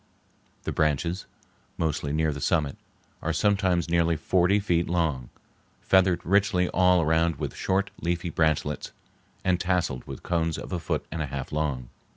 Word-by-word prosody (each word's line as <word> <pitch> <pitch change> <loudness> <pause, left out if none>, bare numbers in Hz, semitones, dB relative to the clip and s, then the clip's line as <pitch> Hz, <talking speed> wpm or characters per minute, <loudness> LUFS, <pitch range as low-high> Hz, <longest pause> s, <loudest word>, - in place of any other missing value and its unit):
The - - -2
branches, 80 +5 0 0.5
mostly 75 -3 -1
near 80 0 +1
the 70 - -7
summit, 75 -2 +1 0.5
are 85 - -1
sometimes 95 0 +2
nearly 85 -1 +2
forty 90 +5 +2
feet 85 -4 0
long, 80 -8 0 0.5
feathered 95 -2 +3
richly 95 -1 +3
all 90 -2 +4
around 80 +1 +2
with - - -5
short, 95 +1 0
leafy 85 0 -2
branchlets, 75 -1 0 0.5
and 90 -1 +2
tasseled 90 -8 -1
with 70 - -8
cones 85 -2 0
a 90 - -4
foot - - -2
and 80 - -3
a 75 - -2
half 70 0 -5
long. 70 -5 -2
85 Hz, 150 wpm, -26 LUFS, 75-90 Hz, 0.5 s, all